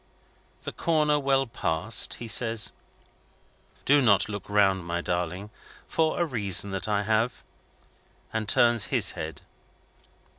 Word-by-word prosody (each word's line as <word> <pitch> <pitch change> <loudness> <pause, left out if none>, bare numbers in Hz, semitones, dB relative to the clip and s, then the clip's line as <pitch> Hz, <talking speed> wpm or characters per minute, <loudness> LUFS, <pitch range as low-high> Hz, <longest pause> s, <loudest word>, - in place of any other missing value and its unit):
The - - -5
corner 150 -3 +1
well 135 -1 +1
passed, 100 -2 0
he 120 - -8
says: 115 -1 +2 1.1
"Do 145 +1 +4
not 100 -7 +3
look 100 -2 -7
round, 95 -3 +2
my 85 0 -3
darling, 90 +4 -4 0.4
for 160 0 -1
a 175 - +2
reason 100 - +2
that 95 +1 -4
I 105 -1 0
have," 110 +3 -1 0.9
and 110 -2 -3
turns 120 -2 +3
his - - +2
head. 80 +1 -7
110 Hz, 125 wpm, -26 LUFS, 95-125 Hz, 1.1 s, Do